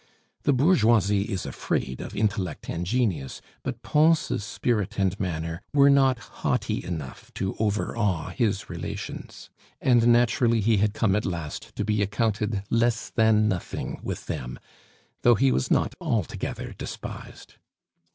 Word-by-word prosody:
The 145 Hz, -, +4 dB
bourgeoisie 115 Hz, -, +3 dB
is 95 Hz, -3 st, -2 dB
afraid 65 Hz, -1 st, -2 dB
of -, -, -7 dB
intellect 100 Hz, -6 st, -1 dB
and 85 Hz, +1 st, -3 dB
genius, 95 Hz, -, -1 dB, 0.2 s
but -, -, -5 dB
Pons' 155 Hz, -6 st, +3 dB
spirit 105 Hz, -1 st, -1 dB
and 95 Hz, -1 st, +1 dB
manner 85 Hz, -3 st, -3 dB
were 140 Hz, 0 st, +7 dB
not 135 Hz, -2 st, +4 dB, 0.2 s
haughty -, -, 0 dB
enough 80 Hz, -7 st, -6 dB
to 95 Hz, -, -2 dB
overawe 105 Hz, -4 st, 0 dB
his 105 Hz, -4 st, 0 dB
relations, 85 Hz, -2 st, -7 dB, 0.3 s
and 120 Hz, -2 st, +4 dB
naturally 120 Hz, -1 st, +4 dB
he 110 Hz, +1 st, +3 dB
had 105 Hz, +1 st, +1 dB
come 100 Hz, -4 st, +2 dB
at 105 Hz, -, 0 dB
last 85 Hz, -5 st, -5 dB
to 105 Hz, -, -2 dB
be 105 Hz, -1 st, +1 dB
accounted 105 Hz, 0 st, 0 dB
less 115 Hz, 0 st, +1 dB
than 110 Hz, -2 st, +4 dB
nothing 95 Hz, -5 st, -3 dB
with -, -, -5 dB
them, -, -, -5 dB, 0.6 s
though 120 Hz, -1 st, +6 dB
he 135 Hz, +5 st, +3 dB
was 65 Hz, -, 0 dB
not -, -, +2 dB
altogether -, -, -2 dB
despised. -, -, -8 dB
105 Hz, 140 wpm, -26 LUFS, 95-120 Hz, 0.6 s, were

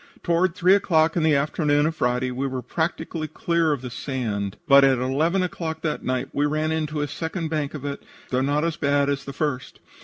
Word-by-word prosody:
"Toward 170 Hz, +1 st, +1 dB
three 185 Hz, -1 st, +4 dB
o'clock 165 Hz, -5 st, +3 dB
in 170 Hz, -, +1 dB
the 155 Hz, -2 st, +4 dB
afternoon 145 Hz, +1 st, +1 dB
of 160 Hz, +1 st, -1 dB
Friday 125 Hz, -1 st, 0 dB
we 130 Hz, +2 st, -2 dB
were 130 Hz, -1 st, -4 dB
practically 160 Hz, +2 st, -3 dB
clear 170 Hz, 0 st, 0 dB
of 140 Hz, -4 st, -2 dB
the 125 Hz, -, -6 dB
sand, 110 Hz, -7 st, -3 dB
but 140 Hz, -1 st, +7 dB
at 135 Hz, -1 st, +4 dB
eleven 155 Hz, +9 st, +1 dB
o'clock 160 Hz, -3 st, -4 dB
that 155 Hz, -2 st, -2 dB
night 130 Hz, +1 st, -2 dB
we 145 Hz, +1 st, +1 dB
ran 155 Hz, +1 st, 0 dB
into 155 Hz, -1 st, -2 dB
a 145 Hz, -, -1 dB
second 160 Hz, +3 st, -4 dB
bank 150 Hz, -2 st, -2 dB
of 145 Hz, -2 st, -7 dB
it, 140 Hz, 0 st, -4 dB, 0.3 s
though 125 Hz, 0 st, +1 dB
not 145 Hz, +3 st, +1 dB
as 165 Hz, -1 st, -2 dB
bad 140 Hz, -1 st, +2 dB
as 140 Hz, -1 st, -2 dB
the 140 Hz, -, -5 dB
first. 140 Hz, -3 st, -3 dB
150 Hz, 215 wpm, -24 LUFS, 135-160 Hz, 0.3 s, but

